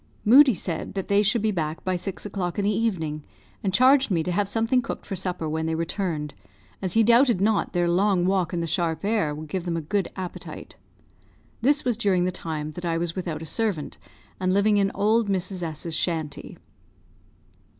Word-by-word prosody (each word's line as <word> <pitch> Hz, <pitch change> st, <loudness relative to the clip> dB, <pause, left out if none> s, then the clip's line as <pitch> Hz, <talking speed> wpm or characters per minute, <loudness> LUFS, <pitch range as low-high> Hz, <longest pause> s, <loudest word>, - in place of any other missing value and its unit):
Moodie 260 Hz, +2 st, +7 dB
said 170 Hz, +1 st, -4 dB
that 195 Hz, -, -4 dB
they 200 Hz, 0 st, +4 dB
should 215 Hz, +2 st, +2 dB
be 220 Hz, -, +2 dB
back 160 Hz, -4 st, -3 dB
by 185 Hz, 0 st, 0 dB
six 185 Hz, +3 st, -5 dB
o'clock 185 Hz, -4 st, -3 dB
in 200 Hz, -, 0 dB
the 205 Hz, 0 st, +1 dB
evening, 160 Hz, -9 st, -1 dB, 0.4 s
and 195 Hz, -, 0 dB
charged 260 Hz, +6 st, +5 dB
me 170 Hz, -5 st, +1 dB
to 180 Hz, -, -2 dB
have 200 Hz, +2 st, 0 dB
something 225 Hz, +4 st, +2 dB
cooked -, -, -6 dB
for 195 Hz, -, -4 dB
supper 180 Hz, -3 st, -2 dB
when 160 Hz, +1 st, -2 dB
they 160 Hz, -, -1 dB
returned, 165 Hz, -3 st, -3 dB, 0.5 s
as 185 Hz, -2 st, -1 dB
he 225 Hz, -, +5 dB
doubted 235 Hz, -1 st, +5 dB
not 210 Hz, +1 st, +1 dB
their 175 Hz, -1 st, +1 dB
long 180 Hz, +1 st, +2 dB
walk 185 Hz, -2 st, +1 dB
in 175 Hz, -2 st, -2 dB
the -, -, -1 dB
sharp 165 Hz, 0 st, -1 dB
air 205 Hz, -9 st, 0 dB
would 155 Hz, +1 st, -8 dB
give 180 Hz, +3 st, -3 dB
them 170 Hz, -1 st, -2 dB
a -, -, 0 dB
good 185 Hz, +4 st, -1 dB
appetite. 185 Hz, -2 st, -7 dB, 0.9 s
This 285 Hz, +4 st, +2 dB
was 245 Hz, -3 st, +1 dB
during 190 Hz, -5 st, +2 dB
the 185 Hz, -, 0 dB
time 155 Hz, -3 st, -4 dB
that 175 Hz, +3 st, -9 dB
I 165 Hz, -1 st, 0 dB
was 165 Hz, 0 st, -2 dB
without 170 Hz, -4 st, -4 dB
a -, -, -6 dB
servant, 190 Hz, -4 st, -2 dB, 0.4 s
and 185 Hz, 0 st, +1 dB
living 205 Hz, +2 st, +3 dB
in 195 Hz, -1 st, +3 dB
old 215 Hz, +2 st, +2 dB
Mrs. 190 Hz, -1 st, -1 dB, 0.2 s
's 165 Hz, -, -4 dB
shanty. 160 Hz, -3 st, -3 dB
185 Hz, 200 wpm, -25 LUFS, 165-210 Hz, 0.9 s, Moodie